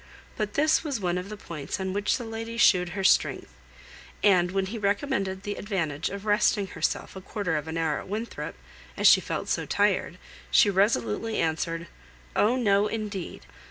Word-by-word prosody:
But 210 -2 -3
this 310 +3 +3
was 285 -7 -2
one 180 -2 0
of 180 +2 -7
the 215 - -7
points 165 -3 -6
on 190 0 -2
which 205 +1 +1
the 245 - -6
lady 225 +1 -6
shewed 180 -6 +4
her 195 - -1
strength; 185 - +2 0.7
and 185 -4 +5
when 195 +1 0
he 220 +4 -5
recommended 200 -2 -1
the 205 - -3
advantage 170 -7 -2
of 200 +1 -7
resting 210 -1 +2
herself 190 - -3
a 190 - -7
quarter 190 -3 -2
of 150 +1 -3
an 160 +1 -4
hour 160 -2 0
at - - -10
Winthrop, 220 +4 -5 0.4
as - - -1
she - - +7
felt - - -4
so - - -1
tired, - - +1 0.3
she 210 -6 +5
resolutely 195 - +1
answered, 165 +1 -1 0.5
"Oh! 225 +4 +3
no, 205 -4 +3
indeed! 210 -4 -5
200 Hz, 180 wpm, -27 LUFS, 180-215 Hz, 0.7 s, she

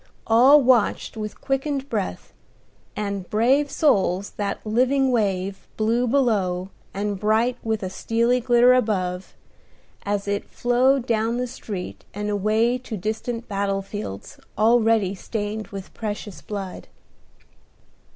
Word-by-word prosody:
All 260 +6 +6
watched 240 -4 +2
with 215 -2 -6
quickened 270 0 -1
breath 210 -7 -4 0.6
and 200 -3 -4
brave 260 +7 +3
souls 200 - +1
that 200 -1 -3
living 255 +4 +2
wave, 195 -4 -1
blue 230 +3 +1
below, 200 -8 +1 0.2
and 200 0 -3
bright 220 +4 +2
with 220 -2 -2
a 185 - -2
steely 235 +5 +1
glitter 245 0 +5
above, 190 -7 -1 0.7
as 205 0 -2
it 200 0 -2
flowed 250 +2 +2
down 230 0 0
the 250 - -1
street 205 -6 -7
and 210 0 -2
away 220 +4 +1
to 235 -3 -6
distant 225 +4 -4
battle 195 -1 -1
fields 195 - -7 0.2
already 225 -2 +3
stained 210 +1 -4
with 195 -2 -9
precious 210 -2 -5
blood. 195 -3 -6
220 Hz, 120 wpm, -23 LUFS, 200-245 Hz, 0.7 s, All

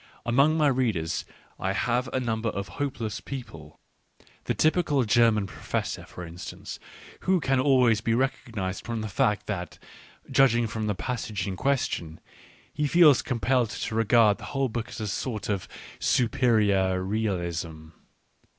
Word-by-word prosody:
Among 140 +7 +3
my 155 - +3
readers 115 - 0 0.3
I 95 +1 -1
have 125 +4 0
a 130 - 0
number 115 -2 -1
of 100 -1 -4
hopeless 125 -7 -2
people, 80 - -9 0.7
the - - -1
typical 155 -4 +2
German 115 -2 +4
professor 95 - -4
for 90 - -8
instance, 85 +1 -8 0.4
who 185 0 +2
can 135 -3 +1
always 125 -5 +4
be 115 0 +1
recognised 115 -7 -2
from 115 -2 -3
the 110 - -3
fact 105 +1 +1
that, 90 -5 -4 0.5
judging 120 -3 +4
from 110 0 -3
the 105 - 0
passage 110 -3 -3
in 95 - -3
question, 95 - -1 0.5
he 150 - 0
feels 155 -4 +6
compelled 125 -1 +1
to 110 - -4
regard 115 -1 +4
the - - -8
whole 135 -1 +1
book 115 0 -4
as - - -7
a - - -2
sort 110 +2 -3
of 100 -3 -2 0.3
superior 105 -6 +2
R^ealism. 85 -6 -3
115 Hz, 145 wpm, -27 LUFS, 100-130 Hz, 0.7 s, feels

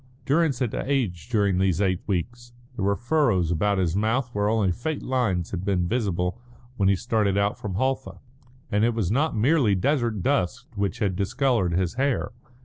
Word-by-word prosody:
Durrance 150 -2 +2
had 125 -4 -2
aged 120 - -2
during 100 -5 +2
these 95 -3 +1
eight 95 -3 +1
weeks. 120 +6 -3 0.2
There 105 - -3
were 100 +1 +2
furrows 120 - +1
about 100 +4 +1
his 90 -2 0
mouth 115 +5 0
where 105 0 +1
only 110 -4 +2
faint 145 - -3
lines 110 -10 -1
had 95 -1 -4
been 95 -3 0
visible 100 -2 -1 0.3
when 100 -4 +2
he - - +5
had - - -7
started 110 -4 +1
out 100 +1 0
from 100 -4 -4
Halfa; 130 +4 -1 0.5
and 105 0 +2
it 115 0 +2
was 105 -5 -1
not 145 +5 +1
merely 125 -3 +3
desert 115 - 0
dust 100 +10 0
which 100 -4 -1
had 100 -4 0
discoloured 100 -1 +1
his 90 -1 0
hair. 140 -2 0
105 Hz, 185 wpm, -25 LUFS, 95-125 Hz, 0.5 s, he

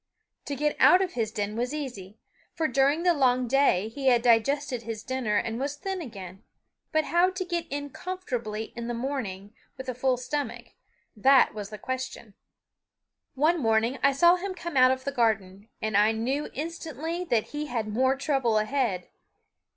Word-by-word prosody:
To 285 - -3
get 295 +2 0
out 370 +1 +7
of 365 - -4
his 225 -3 -1
den 210 -1 -3
was 245 +5 -2
easy, 225 -9 -6 0.4
for 320 - +1
during 275 +5 +2
the 355 -1 +4
long 255 -4 +2
day 245 -7 +3
he 270 +4 -4
had 240 -2 +4
digested 250 +2 +2
his 225 -1 -6
dinner 255 -5 -1
and 225 +2 -2
was 280 +2 -2
thin 380 +5 -4
again; 195 - -9 0.5
but 315 0 +2
how 345 +4 +3
to 370 0 -4
get 345 -1 -3
in 285 0 -4
comfortably 245 -13 -5
in 235 -1 -5
the 240 - -2
morning 225 -6 -4 0.2
with 260 - -8
a 255 - -2
full 255 +1 +1
stomach, 285 +4 -4 0.5
that 265 +5 +5
was 205 -2 -6
the 215 - -8
question. 260 -3 -5 1.0
One 315 +5 +3
morning 225 +2 +1
I 275 - +5
saw 345 +6 +5
him 375 +1 -5
come 340 -3 -6
out 255 -1 +7
of 260 0 -1
the 280 - -2
garden, 215 -5 -1
and 215 -1 -1
I 210 +2 +5
knew 260 +7 -2
instantly 325 +2 -4
that 235 -9 0
he 300 0 -4
had 230 -4 -2
more 260 +5 +2
trouble 265 -5 +1
ahead. 215 -5 0
260 Hz, 180 wpm, -27 LUFS, 225-295 Hz, 1.0 s, out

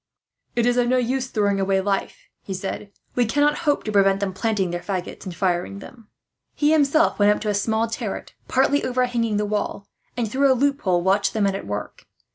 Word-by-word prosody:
"It 235 -1 +2
is 245 0 +2
of 245 -1 +3
no 255 +1 +3
use 255 +1 0
throwing 205 -5 0
away 195 0 +2
life," 195 0 -1 0.2
he 190 - -5
said. 195 +2 -5 0.2
"We 245 -2 +1
cannot 290 +5 +2
hope 290 - +1
to 215 - -3
prevent 195 -1 +3
them 195 -2 -2
planting 200 -3 -1
their 175 0 -3
faggots, 185 -2 -5
and 180 -2 -6
firing 180 +2 -1
them." 225 +2 -13 0.5
He 295 0 +2
himself 310 -1 +3
went 205 0 +5
up 210 - +5
into 215 - -3
a - - +1
small 220 +2 0
turret, 225 -2 -5
partly 275 +2 +2
overhanging 245 -4 0
the 210 - 0
wall 205 -1 -3 0.3
and, 235 -2 0
through 270 +5 +3
a - - +4
loophole, 245 -11 +1
watched 195 +2 +2
the 220 - -1
men 200 -1 +2
at 195 - -6
work. 105 0 -6
210 Hz, 210 wpm, -23 LUFS, 195-250 Hz, 0.5 s, went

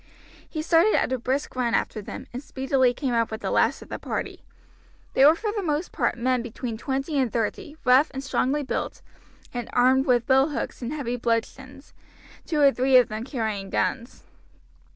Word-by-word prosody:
He 310 -2 -4
started 340 +6 +4
at 260 - +1
a 260 - -1
brisk 260 +4 -2
run 240 -2 +1
after 215 - -1
them, - - -8
and 250 - -5
speedily 265 -2 +1
came 255 0 -3
up 230 -1 +1
to 220 - -4
the - - -4
last - - +2
of - - -18
the - - -5
party. - - -5 0.7
They 265 - +4
were 305 +3 +8
for 425 +4 -3
the 415 - -1
most 315 -1 -2
part 245 -4 0
men 250 +1 +1
between 235 0 -5
twenty 270 +5 -2
and 255 -4 +1
thirty, 240 +6 -3
rough 260 +4 +5
and 270 0 -6
strongly 275 +2 0
built, 270 - -4 0.5
and 240 -2 -4
armed 260 +2 +4
with 245 -2 +3
billhooks 265 -1 +1
and 240 +1 -4
heavy 255 -5 -3
bludgeons, 255 +4 -3 0.5
two 310 - 0
or 280 -1 +7
three 260 0 +4
of 250 - +4
them 215 +1 -4
carrying 220 -7 -3
guns. 210 +7 -2
260 Hz, 190 wpm, -25 LUFS, 235-280 Hz, 0.7 s, were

